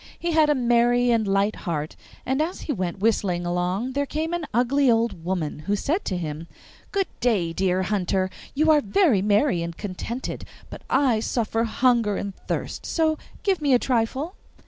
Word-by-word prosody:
He 340 - -2
had 315 -2 +4
a 295 - +4
merry 240 0 +3
and 225 -3 +2
light 200 +2 +1
heart, 155 -4 -4 0.3
and 265 +3 0
as 335 +4 -2
he 295 - -2
went 180 -5 -3
whistling 195 -5 +1
along 180 +7 -1
there 285 +1 -1
came 315 +4 -2
an 345 -3 -2
ugly 255 +4 +2
old 230 -7 +1
woman, 170 -5 -2
who 205 - +2
said 315 - -1
to 185 - -1
him, 160 -1 -5 0.4
'Good 395 -1 +1
day, 200 -9 +1
dear 185 +1 +1
hunter! 190 -1 0 0.2
You 310 +2 +4
are 300 -1 +5
very 230 - +3
merry 205 0 +2
and 170 0 -5
contented, 215 +5 -5 0.3
but - - -8
I 260 -4 +3
suffer 225 0 -1
hunger 230 -2 +2
and 200 -1 -4
thirst, - - -3
so 315 -2 0 0.2
give 385 -5 +1
me 280 -3 +4
a - - +7
trifle. 260 +7 -1
230 Hz, 180 wpm, -24 LUFS, 190-280 Hz, 0.4 s, a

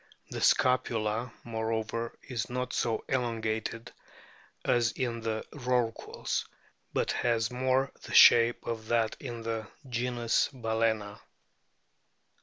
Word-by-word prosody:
The - - -4
scapula, 120 -2 +2
moreover, 115 0 -3
is 120 -6 -4
not 125 +1 -3
so 115 -2 -1
elongated 115 -2 -2 0.7
as 120 -2 +2
in 120 -3 -2
the 110 -1 -2
Rorquals, 125 -5 -1 0.4
but - - 0
has 115 -1 +1
more 130 +2 +1
the - - -9
shape 115 0 +7
of 110 -2 -4
that 115 -1 +1
in 120 -4 -6
the 115 -1 -3 0.2
genus 120 -1 +1
Balcena. 110 -4 -1
115 Hz, 105 wpm, -30 LUFS, 110-125 Hz, 0.7 s, shape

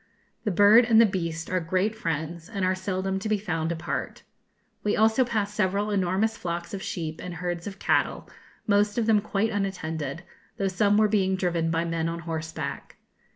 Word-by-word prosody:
The - - +2
bird 205 +5 +6
and 225 -1 +5
the 230 - +8
beast 170 -5 -3
are 185 - +2
great 185 +5 0
friends, 165 -3 -4
and 200 -4 -1
are 185 - +2
seldom 190 0 -2
to 215 - -4
be 215 - +2
found 165 -5 -2
apart. 165 -1 -4 0.6
We 210 - +1
also 220 +4 +4
passed 215 -4 -1
several 205 +1 0
enormous 200 +3 +1
flocks 170 -2 -4
of 195 - -4
sheep 160 -4 -4
and 180 -1 -6
herds 175 0 -4
of 195 -1 -7
cattle, - - 0 0.4
most 205 +1 +2
of 235 - +2
them 215 -2 +4
quite 215 +1 0
unattended, 170 -6 -3 0.3
though 195 -1 0
some 205 +2 +2
were 215 0 +5
being 195 -3 +2
driven 175 -3 0
by 165 +1 0
men 165 -1 -1
on 170 0 -4
horseback. 160 -1 -5
190 Hz, 185 wpm, -26 LUFS, 170-210 Hz, 0.6 s, the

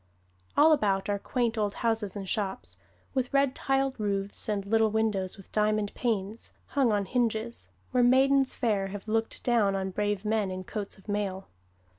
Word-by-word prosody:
All 310 +2 +7
about 200 -9 +2
are 200 0 0
quaint 235 0 -1
old 205 -1 0
houses 225 -4 -1
and 195 -2 -5
shops, 195 -1 -3 0.3
with 260 -2 -1
red 275 -1 +3
tiled 270 -2 0
roofs, 200 0 -2
and 200 -2 -1
little 220 +1 +3
windows, 210 -4 0
with 195 - -15
diamond 215 -1 +1
panes, 215 -2 -2 0.2
hung 270 -6 +2
on 205 -1 +1
hinges, 235 +1 -1 0.2
where 250 - +3
maidens 265 +2 +4
fair 205 -5 0
have 200 +2 -8
looked 225 +1 -1
down 220 -5 +3
on 190 0 -2
brave 205 +1 -1
men 210 -2 +1
in 185 0 -5
coats 205 +2 -5
of 195 - -20
mail. 200 -2 -3
215 Hz, 170 wpm, -28 LUFS, 200-240 Hz, 0.3 s, All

